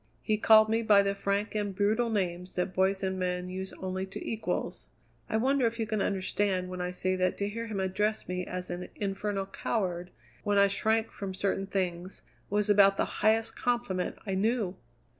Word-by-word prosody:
He 215 - +2
called 220 0 +7
me 225 +1 +1
by 205 -3 +5
the 200 0 +1
frank 200 +1 -1
and 205 -2 -2
brutal 215 +4 +2
names 180 -4 -2
that 180 +1 -1
boys 190 +1 +1
and 190 0 -1
men 180 0 -1 0.4
only 185 0 -3
use 190 - -19
to - - -6
equals. 225 0 -3 0.4
I 220 - +1
wonder 260 +1 +3
if 230 0 -3
you 225 - -1
can 215 -1 -1
understand 190 -1 0
when 180 0 -5
I 180 - -1
say 185 +1 -1
that 185 0 +1
to 200 - -1
hear 230 +3 -4
him 210 -3 -3
address 205 +3 0
me 180 0 -2
as 180 0 -5
an 175 +1 -5
infernal 200 0 -2
coward, 180 -3 -2 0.3
when 205 0 +1
I 200 0 +6
shrank 220 +3 +1
from 195 -2 -5
certain 195 0 -1
things, 185 -1 -3 0.3
was 205 0 +1
about 200 -1 +6
the - - +2 0.2
highest 220 +1 +3
compliment 235 -7 -1
I 195 - -2
knew?" 205 -1 0
200 Hz, 195 wpm, -29 LUFS, 185-215 Hz, 0.4 s, called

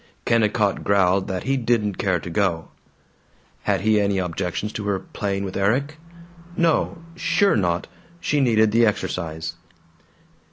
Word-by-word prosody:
Kennicott 105 -3 +2
growled 95 -1 +2
that 95 -1 -3
he 135 +1 +1
didn't 115 -5 0
care 95 -3 +1
to 85 - -7
go. 85 -3 0 1.0
Had - - +1
he 105 0 +3
any 100 -1 +1
objections 90 +3 -3
to 105 - -5
her 100 -1 +1
playing 100 +1 -3
with 95 - -6
Erik? 135 +10 0 0.6
No; 170 0 +2 0.2
sure 200 +1 +2
not; 90 -4 0 0.3
she 150 - 0
needed 110 -4 +3
the 115 +2 +4
exercise. 85 -7 -1
100 Hz, 135 wpm, -23 LUFS, 95-115 Hz, 1.0 s, the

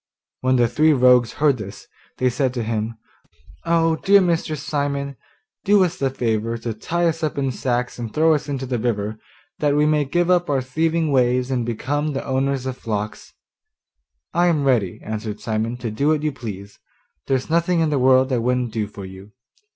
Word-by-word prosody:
When 130 0 +2
the 120 -2 +4
three 155 +6 +3
rogues 125 -3 +4
heard 145 -3 +2
this, 100 -2 -9 0.3
they 130 -1 +2
said 130 +1 -1
to 120 - -1
him: 110 0 -3 0.7
'Oh, 165 -1 +2
dear 200 +5 +5
Mr. 170 -4 0
Simon, 140 -1 -2 0.5
do 205 -1 +5
us 180 -1 -1
the 135 - +1
favour 115 -3 -1
to 115 0 -4
tie 170 +11 -1
us 165 -1 0
up 155 -2 -2
in 135 -2 0
sacks 125 -1 -2
and 115 -2 -5
throw 160 +4 +3
us 150 -1 -2
into 135 -2 -3
the 125 -2 -2
river 110 -2 -2 0.4
that 145 -1 +2
we 150 0 +3
may 150 -1 +2
give 175 +6 +1
up 175 -2 +2
our 140 -2 +2
thieving 160 +4 0
ways 125 0 +2
and 120 -3 -1
become 145 +6 -2
the 135 - -4
owners 135 0 -1
of 130 -1 -4
flocks.' 105 -1 -5 1.0
'I 175 +1 +3
am 155 -4 +2
ready,' 120 -9 +1
answered 110 -1 -5
Simon, 115 +2 -2
'to 120 -2 -4
do 140 +7 -1
what 155 -1 +2
you 155 - +1
please; 105 -6 -8 0.5
there's 135 +3 -1
nothing 170 +1 +2
in 160 -2 +1
the 145 - +1
world 130 +1 +4
I 125 - +2
wouldn't 125 -1 0
do 110 -3 -1
for 100 -2 -9
you. 95 +2 -12
130 Hz, 195 wpm, -21 LUFS, 115-150 Hz, 1.0 s, dear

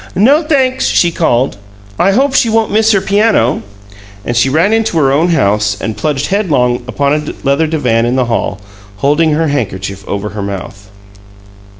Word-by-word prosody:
"No, 265 - +4
thanks," 265 -5 0
she 175 - +2
called. 130 -8 0 0.4
"I 195 +2 +3
hope 270 +5 +1
she 245 -4 +2
won't 225 0 +1
miss 220 +1 +3
her 195 -3 +2
piano!" 200 - +1 0.6
And 120 - -2
she 120 +3 +2
ran 165 +9 +2
into 225 -6 0
her 135 -4 +3
own 155 +5 +2
house 105 - +1
and 110 - -4
plunged 145 +5 -2
headlong 145 -12 0
upon 140 +2 0
a 150 0 -3
leather 140 +4 +2
divan 125 -7 0
in 125 - 0
the 130 -1 +1
hall, 115 -4 -2 0.4
holding 150 +7 +1
her 160 +1 0
handkerchief 100 -7 -4
over 100 +1 -3
her 105 0 -6
mouth. 100 0 -7
145 Hz, 175 wpm, -13 LUFS, -, 0.6 s, No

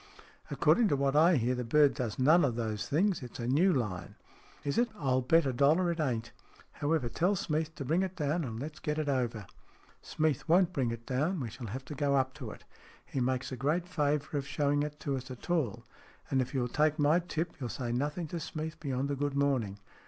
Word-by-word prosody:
" - - -26
According 235 -2 +3
to 145 - +2
what 140 0 +1
I 165 +3 +6
hear, 125 -1 +1
the 125 0 -2
bird 140 +3 +4
does 115 -3 -3
none 155 +6 +5
of 125 -5 +1
those 110 -3 -3
things. 175 +5 +2
It's 125 -2 -8
a 120 - -3
new 160 +9 +4
line." 105 - -2 0.3
" - - -26
Is 140 +7 0
it? 240 0 +2
I'll 130 -5 +1
bet 165 +5 +4
a 135 - 0
dollar 155 +8 +3
it 170 - -4
ain't. 120 -6 -1 0.4
However, 145 -3 0
tell 180 +11 +1
Smeath 160 -2 -2
to 140 - -5
bring 165 +7 +2
it 190 -1 -2
down, 155 +2 0
and 115 -4 -5
let's 150 +3 -6
get 150 -1 -2
it 155 -1 -1
over." 120 -6 -1 0.6
"Smeath 155 -2 -1
won't 180 +1 +4
bring 130 -7 0
it 115 0 -6
down. 155 +8 0
We 120 -5 -4
shall 115 +1 -7
have 130 +6 -6
to 150 - -7
go 140 -1 +1
up 130 -1 +1
to 120 - -4
it. - - -11 0.4
He 135 - -4
makes 130 +1 -1
a - - -3
great 150 +7 0
favour 150 -3 0
of 140 - -6
show 145 -1 0
ing 145 0 +2
it 150 0 -4
to 140 -2 -1
us 130 0 -8
at 130 +7 -7
all. 150 - 0 0.5
And, 130 - +3
if 130 +3 -4
you 130 - +2
will 120 - 0
take 150 +4 +1
my 150 +3 +4
tip, 170 -1 -3
you'll 125 -3 -3
say 120 +2 -3
nothing 145 +7 -1
to 170 - -4
Smeath 160 0 -5
beyond 140 -1 -2
a - - 0
good 145 0 -2
morning. 130 -8 +1
140 Hz, 240 wpm, -31 LUFS, 125-160 Hz, 0.6 s, I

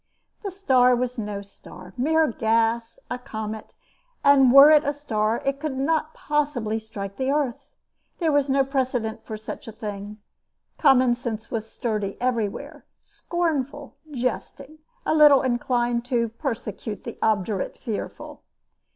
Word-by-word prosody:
The 400 - -2
star 260 -10 +3
was 250 0 -2
no 205 -2 -4
star 185 -2 -14
mere 320 +5 +3
gas 230 -1 0
a 250 - -2
comet; 220 -2 -7 0.5
and 270 -3 +6
were 275 +3 +9
it 305 -1 +6
a 285 - 0
star 225 -6 -1
it 275 0 0
could 295 -3 -3
not 310 +3 0
possibly 285 -8 -1
strike 200 -3 -7
the 265 0 -1
earth. 280 -4 -1 0.5
There 330 -3 +1
was 285 -1 +2
no 270 0 +3
precedent 255 -5 -2
for 215 - -6
such 215 +2 -8
a - - -6
thing. 205 -1 -7 0.6
Common 260 -4 +5
sense 230 -2 -5
was 225 -1 -4
sturdy 210 -5 -3
everywhere, 255 +5 -2 0.2
scornful, 290 -5 -3 0.2
jesting, 275 +3 -4 0.3
a - - +2
little 295 -3 +7
inclined 240 -1 0
to 240 -3 0
persecute 225 -4 -5
the - - -8
obdurate 205 -2 0
fearful. 220 -5 -6
245 Hz, 140 wpm, -24 LUFS, 220-280 Hz, 0.6 s, were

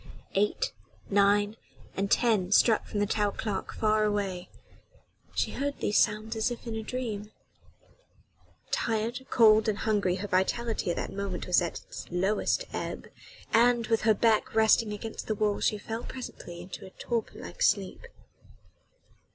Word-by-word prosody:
Eight, 210 - +1 0.4
nine 205 +2 +3 0.4
and 200 +1 -1
ten 210 -7 +2
struck 220 +2 +4
from 205 - -3
the - - +3
tower 205 0 +1
clock 205 -3 -3
far 215 -1 +2
away: 200 -4 -1 0.9
she - - 0
heard 285 +1 -3
these 205 - +2
sounds 215 +2 +1
as 220 +2 +1
in 235 -1 -6
a 220 - -3
dream. 220 -3 -4 1.4
Tired, 230 +3 -1
cold 220 -1 +5
and 205 - -1
hungry 205 -5 +1
her 200 +2 -4
vitality 200 +3 0
at 175 - 0
that - - -4
moment 195 -2 -4
was 180 - +4
at 170 - -3
its - - -9
lowest 195 - 0
ebb - - -5 0.4
and, 240 0 +4
with 225 -1 +2
her 220 -1 +4
back 220 0 +2
resting 220 0 +4
against 215 +2 -6
the 215 - 0
wall 210 -1 0
she 210 - +1
fell 225 +2 -5
presently 175 -9 -8
into 180 +2 -9
a - - -9
torpor 230 +4 -3
like - - -10
sleep. 475 - +1
215 Hz, 150 wpm, -29 LUFS, 200-225 Hz, 1.4 s, cold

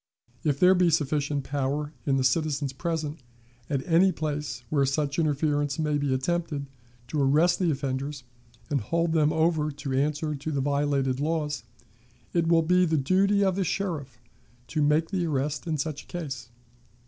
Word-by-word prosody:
If 145 -2 +1
there 185 +1 +7
be 180 -2 +4
sufficient 145 -2 0
power 145 +2 -2
in 135 -1 +3
the 130 - +1
citizens 140 0 0
present, 155 0 -3 0.5
at 135 -2 -1
any 180 +3 +4
place 150 -5 -4
where 145 -2 +3
such 140 +2 0
interference 145 -2 +1
may 150 -2 0
be 145 -1 0
attempted, 145 +2 -1 0.4
to 150 - 0
arrest 155 +6 +3
the 180 -3 +2
offenders, 140 0 -3 0.5
and 140 -3 +1
hold 165 +8 0
them 155 -2 +3
over 160 -1 +2
to 140 -2 -5
answer 150 +3 0
to 150 +2 -4
the 140 - -1
violated 140 -2 +1
laws, 150 -3 -1 0.7
it 170 -1 +2
will 165 -1 +4
be 180 +3 +4
the 160 -1 +1
duty 195 +8 +3
of 190 -2 +2
the 195 - +1
sheriff 160 - -3 0.5
to 155 - -1
make 150 +3 +2
the 180 -4 0
arrest 145 +2 -2
in 160 -2 0
such 150 0 -4
case. 145 -8 -6
150 Hz, 165 wpm, -27 LUFS, 140-165 Hz, 0.7 s, there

